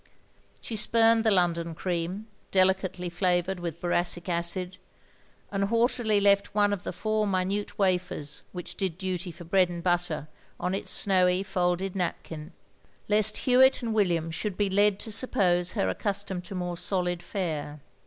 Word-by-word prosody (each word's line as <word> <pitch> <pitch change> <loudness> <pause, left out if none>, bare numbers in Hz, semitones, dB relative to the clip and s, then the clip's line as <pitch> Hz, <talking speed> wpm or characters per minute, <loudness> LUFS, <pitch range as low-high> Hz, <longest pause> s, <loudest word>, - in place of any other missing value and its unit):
She - - -6
sptimed 225 +1 +4
the 220 - +3
London 170 -4 +1
cream, 180 +4 -3 0.2
delicately 190 -1 +2
flavoured 180 +1 0
with 170 -2 -5
boracic 175 0 -1
acid, 180 +1 -1 0.7
and 195 0 0
haughtily 230 -1 +2
left 200 0 +3
one 205 -1 +3
of 195 - -3
the - - -3
four 215 0 -1
minute 195 +2 -1
wafers 180 -6 -1
which 180 -2 -6
did 185 -4 -3
duty 185 -1 -3
for 175 +1 -10
bread 185 +1 +2
and 170 -1 -6
butter 175 -4 0 0.3
on 180 +1 -1
its 195 - -3
snowy 185 -1 +2
folded 180 0 -1
napkin, 165 -3 -4 0.6
lest 210 0 +3
Hewitt 260 +1 +5
and 225 -1 -1
William 170 -6 +1
should 190 +3 -3
be 205 -2 0
led 205 0 +3
to 220 - -5
suppose 185 -6 +2
her 95 - 0
accustomed 190 - -2
to 195 - -7
more 180 -1 -3
solid 180 -2 0
fare. 155 -6 -4
185 Hz, 155 wpm, -27 LUFS, 175-205 Hz, 0.7 s, Hewitt